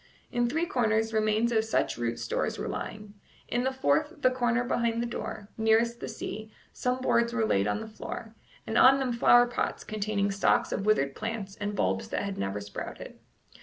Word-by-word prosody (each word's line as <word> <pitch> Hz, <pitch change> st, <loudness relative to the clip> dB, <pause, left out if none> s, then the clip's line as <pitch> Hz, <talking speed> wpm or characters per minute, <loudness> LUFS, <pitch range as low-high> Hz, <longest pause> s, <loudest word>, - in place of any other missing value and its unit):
In 240 Hz, -1 st, +1 dB
three 320 Hz, +6 st, 0 dB
corners 225 Hz, -5 st, +1 dB
remains 215 Hz, +2 st, +2 dB
of 220 Hz, -1 st, +3 dB
such 220 Hz, -, 0 dB
root 120 Hz, 0 st, -2 dB
stores -, -, -2 dB
were -, -, -4 dB
lying; 210 Hz, -1 st, -6 dB, 0.3 s
in 240 Hz, +1 st, 0 dB
the 265 Hz, -, +1 dB
fourth, 260 Hz, -, +1 dB
the 255 Hz, -, +5 dB
corner 245 Hz, -1 st, +1 dB
behind 235 Hz, -2 st, 0 dB
the 240 Hz, -, 0 dB
door, 215 Hz, -3 st, -5 dB
nearest 225 Hz, +2 st, +3 dB
the -, -, -5 dB
sea, 215 Hz, +1 st, -6 dB, 0.2 s
some 250 Hz, +1 st, -1 dB
boards 235 Hz, -2 st, +2 dB
were 225 Hz, -2 st, +1 dB
laid 100 Hz, -, +2 dB
on 105 Hz, 0 st, -1 dB
the -, -, -6 dB
floor, 220 Hz, +1 st, -7 dB, 0.3 s
and 220 Hz, -, +1 dB
on 265 Hz, +1 st, +8 dB
them 260 Hz, -3 st, -1 dB
flower 240 Hz, +1 st, +6 dB
pots 245 Hz, -, -2 dB
containing 205 Hz, -1 st, -1 dB
stalks 235 Hz, +4 st, +2 dB
of 200 Hz, -, -2 dB
withered 140 Hz, -11 st, +3 dB
plants 215 Hz, -1 st, -5 dB
and 205 Hz, 0 st, -3 dB
bulbs 95 Hz, -, 0 dB
that -, -, -2 dB
had 200 Hz, -1 st, -4 dB
never 100 Hz, +1 st, -2 dB
sprouted. 100 Hz, 0 st, -8 dB
220 Hz, 195 wpm, -28 LUFS, 200-240 Hz, 0.3 s, on